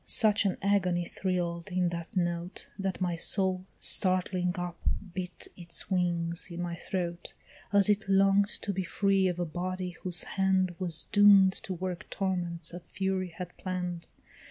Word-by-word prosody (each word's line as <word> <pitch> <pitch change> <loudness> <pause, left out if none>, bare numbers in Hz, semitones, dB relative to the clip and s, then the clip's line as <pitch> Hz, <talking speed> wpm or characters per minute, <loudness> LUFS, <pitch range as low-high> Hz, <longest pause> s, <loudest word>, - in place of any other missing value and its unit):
such 210 -2 +5
an 190 - -1
agony 185 -3 +1
thrill'd 175 -1 -3
in 180 -1 +1
that 170 +2 -6
note, 175 0 -2
That 195 -1 -2
my 180 -1 0
soul, 185 +2 +1
startling 185 -1 +3
up, 175 -1 -5 0.3
beat 180 -1 -5
its 170 +2 -3
wings 170 -2 0
in 170 0 -7
my 175 -1 -3
throat, 175 -1 -4 0.4
As 200 -1 +5
it 210 -1 +1
long'd 195 +1 +4 0.2
to 200 - -1
be 190 0 -2
free 195 +1 +1
of 180 -1 -2
a 175 - 0
body 180 +2 -4
whose 175 0 0
hand 190 -2 +1
Was 175 -4 +1
doom'd 200 -2 +7
to 190 - -5
work 180 0 -5
torments 175 -4 -2
a 175 - -6
Fury 190 +1 -2
had 180 -1 -7
plann'd! 180 -2 -4
185 Hz, 155 wpm, -29 LUFS, 175-190 Hz, 0.4 s, doom'd